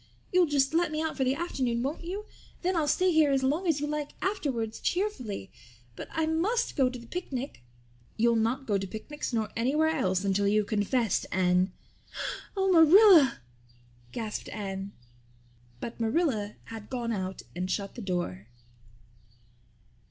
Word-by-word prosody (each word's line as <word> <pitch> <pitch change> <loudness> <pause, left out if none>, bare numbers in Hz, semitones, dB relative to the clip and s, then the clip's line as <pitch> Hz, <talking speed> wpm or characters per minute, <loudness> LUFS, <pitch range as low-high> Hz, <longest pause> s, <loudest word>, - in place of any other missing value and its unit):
You'll 360 -1 +5
just 280 -1 +2
let 335 -1 +2
me 310 - -2
out 320 0 -2
for 265 - 0
the 260 +1 +1
afternoon, 255 -8 -1
won't 290 +6 -3
you? 390 +5 -5 0.4
Then 365 +1 +1
I'll 315 -3 +1
stay 365 +5 +3
here 315 -3 +4
as 270 -1 +2
long 305 +8 +1
as 315 -4 +2
you 295 - -1
like 295 -1 -3
afterwards 260 - -2
cheerfully. 255 - -2 0.4
But - - -7
I 320 - 0
must 365 +10 0
go 265 -3 +3
to 250 - -7
the 235 - -12
picnic." 275 - -5 0.6
"You'll 235 +1 +3
not 230 +5 0
go 205 -4 +1
to 195 - -4
picnics 245 +10 -6
nor 220 -3 -1
anywhere 285 +7 +2
else 195 - 0
until 200 +1 +2
you've 210 +1 +3
confessed, 215 +1 0
Anne." 185 0 +2 0.9
"Oh, 385 0 +2
Marilla," 335 - +7 0.7
gasped 215 - -4
Anne. 195 -1 -5 0.9
But 230 - -6
Marilla 225 -4 0
had 220 -2 -9
gone 240 -3 -2
out 190 -3 -4
and 180 +1 -3
shut 200 0 -2
the 245 - -8
door. 175 - -3
255 Hz, 160 wpm, -29 LUFS, 210-320 Hz, 0.9 s, Marilla